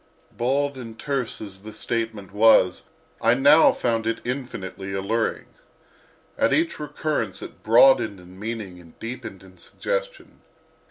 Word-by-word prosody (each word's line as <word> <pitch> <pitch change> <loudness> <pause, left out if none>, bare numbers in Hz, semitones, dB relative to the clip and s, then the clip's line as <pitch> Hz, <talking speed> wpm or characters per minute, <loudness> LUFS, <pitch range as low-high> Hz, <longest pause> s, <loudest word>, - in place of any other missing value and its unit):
Bald 140 +3 0
and 115 -2 -9
terse 135 -3 -2
as 95 -3 -8
the 110 +1 -9
statement 110 -2 -3
was, 105 -4 +4 0.4
I 115 +1 +4
now 145 +4 +6
found 115 -2 -1
it 115 0 -1
infinitely 105 -7 -5
alluring. 105 +4 -1 0.9
At - - +3
each 325 0 +1
recurrence 150 +1 -3
it - - -11
broadened 115 -3 +5
in 90 +1 -15
meaning 105 -4 -5
and 85 -2 -17
deepened 115 -5 -7
in 95 -1 -17
suggestion. - - -5
115 Hz, 130 wpm, -24 LUFS, 100-135 Hz, 0.9 s, now